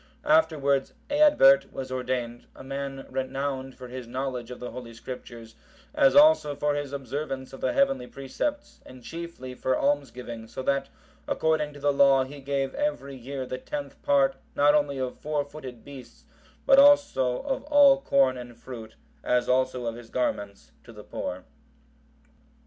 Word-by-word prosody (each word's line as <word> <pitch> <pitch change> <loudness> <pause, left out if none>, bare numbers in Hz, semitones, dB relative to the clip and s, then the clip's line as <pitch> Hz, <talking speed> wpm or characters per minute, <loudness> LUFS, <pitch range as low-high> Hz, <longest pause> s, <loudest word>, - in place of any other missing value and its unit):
Afterwards 150 -4 +2 0.2
Eadbert(762) 285 - +5
was 130 -1 -6
ordained, 125 -2 -3
a - - -11
man 135 0 -5
renowned 135 0 -3
for 125 - -9
his 125 -1 -8
knowledge 125 -1 -4
of 125 - -8
the 125 - -6
Holy 115 -1 -9
Scriptures, 115 -1 -9 0.4
as 290 -3 +4
also 290 - +6
for 145 +1 0
his 145 -1 -3
observance 135 -1 -5
of 135 - -10
the - - +1
heavenly 275 - +1
precepts, 285 - -4
and 130 -1 -14
chiefly 165 -6 -7
for 130 0 0
almsgiving, 125 -5 -2
so 130 - -7
that, 140 +1 0 0.4
according 155 -2 0
to 145 - -11
the 145 0 +1
law, 135 -1 +5
he 140 +2 -9
gave 135 0 -2
every 290 - -2
year 130 +1 -6
the 130 0 -5
tenth 290 - -6
part, 275 -2 +3 0.2
not 145 +1 +5
only 145 -2 +1
of 130 -1 -4
four 150 -1 -2
footed 135 -5 -10
beasts, 135 -3 -12 0.4
but 275 0 +7
also 280 - +5
of 275 -1 -2
all 285 -2 +6
corn 135 - +3
and 120 -1 -10
fruit, 115 -4 -10 0.3
as 125 0 +1
also 130 -1 +1
of 115 - -2
his 115 -1 -11
garments, 105 -5 -3
to - - -13
the - - -12
poor. 90 0 -5
135 Hz, 160 wpm, -27 LUFS, 125-150 Hz, 0.4 s, but